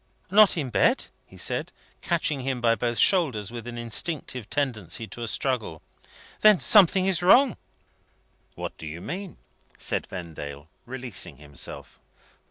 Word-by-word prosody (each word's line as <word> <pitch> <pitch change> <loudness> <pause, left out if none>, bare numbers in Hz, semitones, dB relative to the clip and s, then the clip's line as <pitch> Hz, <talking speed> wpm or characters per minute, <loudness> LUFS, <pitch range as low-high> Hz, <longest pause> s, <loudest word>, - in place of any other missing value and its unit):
"Not 210 -2 +6
in 135 -6 -2
bed?" 95 -3 +2 0.2
he - - -16
said, - - -1 0.3
catching 145 -3 0
him 130 -1 -2
by 115 -1 +3
both 120 +1 -2
shoulders 125 - +3
with 120 0 -7
an 120 -1 -6
instinctive 120 0 -2
tendency 115 - -2
to 120 - -9
a 115 - -3
struggle. 110 - -2 0.6
"Then 215 -4 +6
something 190 -2 +5
is 190 -3 +1
wrong!" 245 +6 +6 1.0
"What - - -6
do 80 - -7
you 80 +2 -7
mean?" 185 - -6 0.4
said - - -2
Vendale, 75 -4 -8 0.2
releasing 125 -5 -5
himself. 70 -1 -9
120 Hz, 140 wpm, -26 LUFS, 105-170 Hz, 1.0 s, Not